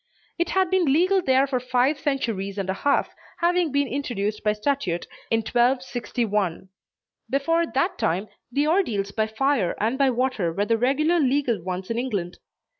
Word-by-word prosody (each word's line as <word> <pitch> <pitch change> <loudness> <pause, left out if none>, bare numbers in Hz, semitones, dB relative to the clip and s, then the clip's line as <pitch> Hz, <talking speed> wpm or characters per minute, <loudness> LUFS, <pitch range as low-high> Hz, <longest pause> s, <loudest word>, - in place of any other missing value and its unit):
It 345 - +1
had 380 -1 +1
been 360 -7 +3
legal 370 +6 +3
there 265 -3 +3
for 265 -2 -1
five 255 +3 +1
centuries 225 -9 -2
and 195 -2 -2
a - - -1
half, 280 +9 0 0.2
having 345 -2 +1
been 280 0 +1
introduced 215 -6 -3
by 210 - +2
statute 210 -6 -1 0.2
in 225 0 +2
1261. 240 -6 0 0.6
Before 330 +5 +1
that 340 +8 -1
time, 185 +6 0 0.2
the 285 +4 +1
ordeals 240 - +1
by 220 +1 0
fire 220 -4 0
and 230 +6 0
by 275 -1 +4
water 245 -8 0
were 200 +5 -1
the 230 +1 +1
regular 305 +8 +2
legal 265 - +1
ones 185 +3 -4
in 230 - -1
England. 200 -9 -3
250 Hz, 165 wpm, -24 LUFS, 210-285 Hz, 0.6 s, by